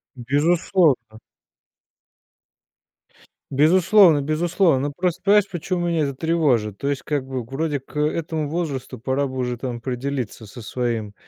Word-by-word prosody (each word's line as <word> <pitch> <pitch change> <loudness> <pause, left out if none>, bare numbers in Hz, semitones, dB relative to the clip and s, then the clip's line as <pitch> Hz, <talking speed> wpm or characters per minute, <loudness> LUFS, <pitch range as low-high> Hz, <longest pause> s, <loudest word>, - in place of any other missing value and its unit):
Безусловно. 145 - +1 2.3
Безусловно, 170 +2 +5
безусловно. 155 -2 +1
Просто 180 -1 -1
понимаешь 205 0 +4
почему 175 0 -2
меня 165 -3 +1
это 140 -1 -4
тревожит. 130 - +1
То 140 - -4
есть 140 -3 -2
как 145 -3 -2
бы 130 -2 -4
вроде 140 +3 -3
к 150 - -7
этому 155 0 -1
возрасту 145 -5 -4
пора 130 +4 -1
бы 130 - -8
уже 125 -1 -2
там 125 -1 -4
определиться 125 -2 -4
со 120 +4 -11
своим 115 -3 -3
140 Hz, 130 wpm, -22 LUFS, 125-165 Hz, 2.3 s, Безусловно